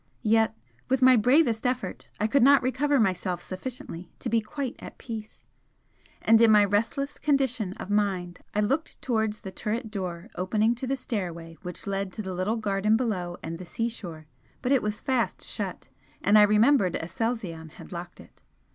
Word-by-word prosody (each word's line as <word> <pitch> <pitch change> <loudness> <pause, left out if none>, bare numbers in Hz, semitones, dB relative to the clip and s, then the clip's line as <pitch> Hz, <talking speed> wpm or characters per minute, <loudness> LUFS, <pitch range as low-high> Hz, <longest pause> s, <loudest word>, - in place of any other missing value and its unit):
Yet 220 0 +3 0.3
with 260 0 +2
my 255 0 +8
bravest 245 0 +3
effort 250 -6 -3
I 210 - +1
could 255 +5 +3
not 275 +1 +6
recover 275 +2 +2
myself 185 -3 0
sufficiently 185 -4 -7
to - - -4
be 230 -1 +3
quite 260 +3 -4
at - - -10
peace, 220 -3 -8 0.8
and 225 0 +6
in 230 - +7
my 210 -1 +7
restless 225 +8 -1
condition 260 -9 +1
of 200 - -7
mind 190 -4 0 0.2
I 210 - +3
looked 275 +10 -1
towards 220 -3 0
the 190 - -7
turret 220 +3 -3
door 185 0 -5
opening 210 +5 +1
to 240 +2 -5
the 270 +1 0
stairway 170 -9 -4
which 180 -1 -6
led 195 -1 -2
to 215 - -4
the 190 -1 -4
little 185 +6 -1
garden 210 0 +2
below 185 -8 -2
and 165 +1 -5
the - - -6
seashore 180 -7 -4 0.4
but 250 - 0
it 275 - +4
was 210 0 -3
fast 260 -4 -1
shut, - - -5 0.3
and 205 - +4
I 210 - +9
remembered 215 -2 +4
Aselzion 175 -3 -3
had - - -12
locked 175 0 -7
it. - - -17
215 Hz, 175 wpm, -27 LUFS, 185-245 Hz, 0.8 s, I